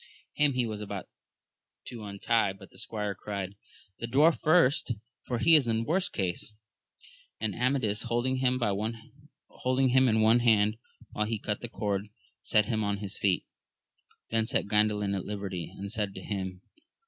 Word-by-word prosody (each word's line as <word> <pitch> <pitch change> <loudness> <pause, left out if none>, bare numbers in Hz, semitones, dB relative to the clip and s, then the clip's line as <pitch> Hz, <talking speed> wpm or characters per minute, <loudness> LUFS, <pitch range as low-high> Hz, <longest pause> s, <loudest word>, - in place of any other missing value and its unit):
Him 150 -1 +3
he 125 -1 +1
was 110 -2 -4
about 105 - -5 0.8
to 115 -3 -7
untie, 100 0 +1
but 95 0 -15
the - - -12
squire 105 -2 -3
cried, 100 0 -5 0.5
The 115 - -3
dwarf 150 +7 +4
first, 155 -6 +4 0.3
for 125 - -1
he 165 +8 +5
is 150 -6 +7
in 115 0 +1
worst 180 +7 +1
case; 95 +1 -2 0.9
and 110 -2 -1
Amadis 125 -4 0
holdmg 120 +2 0
him 130 +2 0
in 110 -2 +3
one 110 +2 +5
hand 110 -2 +3 0.3
while 105 - -1
he 115 0 -1
cut 105 0 -3
the 120 - -5
cord, 100 -2 -2 0.3
set 105 -2 +3
him 110 0 -1
on 100 0 0
his 100 0 -6
feet; 95 -3 +1 0.9
then 115 -1 +1
set - - +1
Gandalin 105 -1 +2
at 95 - -3
liberty, 100 -5 -4
and 100 0 -6
said 105 -3 -2
to 95 - -7
him. 95 -2 -4
110 Hz, 160 wpm, -29 LUFS, 100-125 Hz, 0.9 s, is